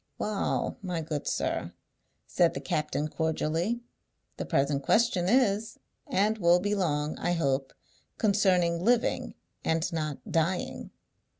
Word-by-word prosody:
"Wa'al, 210 Hz, -2 st, -1 dB
my 180 Hz, -4 st, -3 dB
good 155 Hz, -2 st, -4 dB
sir," -, -, -1 dB, 0.5 s
said -, -, +2 dB
the -, -, -2 dB
captain 150 Hz, -1 st, -1 dB
cordially, 160 Hz, +8 st, -1 dB, 0.6 s
"the -, -, -3 dB
present 140 Hz, +1 st, +1 dB
question 185 Hz, -, +2 dB
is, 225 Hz, -3 st, +2 dB, 0.3 s
and 210 Hz, +3 st, +1 dB
will 175 Hz, -1 st, +5 dB
be 205 Hz, +3 st, -1 dB
long, 150 Hz, -6 st, 0 dB
I 175 Hz, -, 0 dB
hope, 135 Hz, -5 st, 0 dB, 0.5 s
concerning 185 Hz, -5 st, +2 dB
living, 240 Hz, +2 st, +1 dB, 0.3 s
and 165 Hz, +2 st, 0 dB
not 155 Hz, -3 st, -2 dB
dying. 170 Hz, +3 st, -1 dB
175 Hz, 120 wpm, -29 LUFS, 155-205 Hz, 0.6 s, will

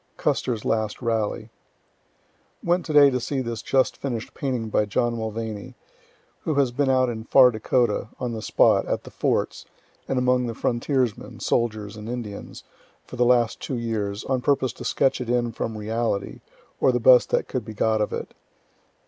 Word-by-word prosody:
CUSTER'S 115 Hz, -4 st, -1 dB
LAST 110 Hz, -1 st, -1 dB
RALLY 110 Hz, -1 st, -1 dB, 1.1 s
Went 175 Hz, 0 st, +1 dB
to -, -, -3 dB
day 145 Hz, -2 st, +7 dB
to 125 Hz, -, 0 dB
see 135 Hz, +3 st, -2 dB
this 115 Hz, -3 st, -3 dB
just 130 Hz, +1 st, +1 dB
finish'd 120 Hz, -5 st, -4 dB
painting 125 Hz, -5 st, -3 dB
by 105 Hz, -, +2 dB
John 120 Hz, +3 st, 0 dB
Mulvany, 110 Hz, -2 st, -5 dB, 0.6 s
who 155 Hz, -, -2 dB
has 140 Hz, -3 st, +2 dB
been 140 Hz, +2 st, 0 dB
out 130 Hz, -1 st, +3 dB
in 110 Hz, -2 st, -4 dB
far 130 Hz, -1 st, +6 dB
Dakota, 110 Hz, -1 st, 0 dB
on 125 Hz, -2 st, -3 dB
the 110 Hz, -, -5 dB
spot, -, -, +3 dB
at -, -, -2 dB
the -, -, -11 dB
forts, -, -, -1 dB, 0.4 s
and 135 Hz, -, -1 dB
among 125 Hz, 0 st, +2 dB
the 115 Hz, -, -4 dB
frontiersmen, 125 Hz, -1 st, -1 dB
soldiers 110 Hz, -3 st, -1 dB
and 105 Hz, +1 st, -8 dB
Indians, 115 Hz, -5 st, -6 dB, 0.4 s
for -, -, -10 dB
the 125 Hz, -, +2 dB
last 120 Hz, -2 st, +3 dB
two 130 Hz, -, -4 dB
years, 105 Hz, -3 st, -3 dB
on 130 Hz, -2 st, -1 dB
purpose 130 Hz, -2 st, +1 dB
to -, -, -10 dB
sketch 135 Hz, -1 st, +1 dB
it 120 Hz, -, -5 dB
in 120 Hz, -1 st, +1 dB
from 110 Hz, 0 st, -4 dB
reality, 110 Hz, -1 st, -2 dB, 0.4 s
or 130 Hz, -, +4 dB
the 125 Hz, -, 0 dB
best 125 Hz, +1 st, +6 dB
that -, -, 0 dB
could 130 Hz, -, -3 dB
be 110 Hz, 0 st, -9 dB
got 110 Hz, +1 st, +1 dB
of 105 Hz, -, -1 dB
it. -, -, -5 dB
120 Hz, 180 wpm, -24 LUFS, 110-130 Hz, 1.1 s, day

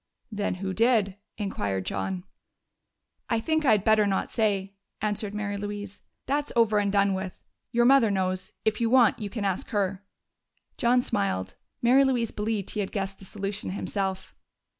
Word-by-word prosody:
"Then 205 Hz, -3 st, -1 dB
who 190 Hz, +1 st, -3 dB
did?" 215 Hz, -3 st, +2 dB, 0.2 s
inquired 100 Hz, -, -2 dB
John. 95 Hz, -2 st, -3 dB, 1.1 s
"I 230 Hz, -, +2 dB
think 315 Hz, +6 st, 0 dB
I 225 Hz, -, +6 dB
had 205 Hz, -3 st, +2 dB
better 215 Hz, -1 st, +4 dB
not 195 Hz, -1 st, -1 dB
say," 200 Hz, -4 st, 0 dB, 0.3 s
answered 210 Hz, -1 st, -1 dB
Mary 205 Hz, -1 st, -2 dB
Louise. 205 Hz, -1 st, -6 dB, 0.2 s
"That's 290 Hz, +2 st, -1 dB
over 220 Hz, -3 st, +4 dB
and 200 Hz, -1 st, +1 dB
done 200 Hz, -1 st, +3 dB
with. 190 Hz, -1 st, -5 dB, 0.3 s
Your 240 Hz, 0 st, +3 dB
mother 265 Hz, -3 st, +6 dB
knows 185 Hz, -1 st, -1 dB
if 220 Hz, +1 st, +1 dB
you 230 Hz, -, +2 dB
want, 245 Hz, -1 st, +5 dB
you 210 Hz, -2 st, -4 dB
can 210 Hz, -1 st, -3 dB
ask 190 Hz, -2 st, -1 dB
her." 195 Hz, -2 st, -1 dB, 0.7 s
John 245 Hz, -1 st, +3 dB
smiled. 95 Hz, -, -1 dB, 0.3 s
Mary 255 Hz, +3 st, +6 dB
Louise 245 Hz, -4 st, +1 dB
believed 210 Hz, -2 st, -2 dB
he 215 Hz, -, -4 dB
had 195 Hz, -, -2 dB
guessed 195 Hz, -1 st, -3 dB
the 195 Hz, -, -12 dB
solution 200 Hz, +1 st, -4 dB
himself. 190 Hz, 0 st, -3 dB
205 Hz, 165 wpm, -27 LUFS, 195-225 Hz, 1.1 s, I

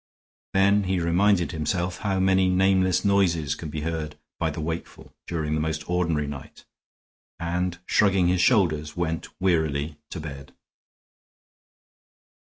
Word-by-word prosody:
Then 100 Hz, +1 st, +4 dB
he 95 Hz, -1 st, 0 dB
reminded 90 Hz, +2 st, +2 dB
himself 85 Hz, +3 st, -2 dB
how 95 Hz, -2 st, -1 dB
many 95 Hz, 0 st, +3 dB
nameless 95 Hz, 0 st, +2 dB
noises 85 Hz, -7 st, +2 dB
can 80 Hz, +1 st, -7 dB
be 75 Hz, +1 st, -4 dB
heard 75 Hz, -2 st, -4 dB, 0.2 s
by -, -, +1 dB
the -, -, -6 dB
wakeful 80 Hz, +2 st, -6 dB
during 80 Hz, -3 st, -2 dB
the 75 Hz, -, 0 dB
most 80 Hz, -1 st, -3 dB
ordinary 85 Hz, -4 st, 0 dB
night, 70 Hz, -2 st, -9 dB, 0.7 s
and 90 Hz, +1 st, -2 dB
shrugging 95 Hz, -3 st, +3 dB
his 90 Hz, 0 st, +2 dB
shoulders, 80 Hz, -8 st, +2 dB
went 80 Hz, -2 st, -2 dB
wearily 80 Hz, -5 st, 0 dB
to 85 Hz, -, -6 dB
bed. 70 Hz, -3 st, -9 dB
85 Hz, 130 wpm, -25 LUFS, 75-95 Hz, 0.7 s, Then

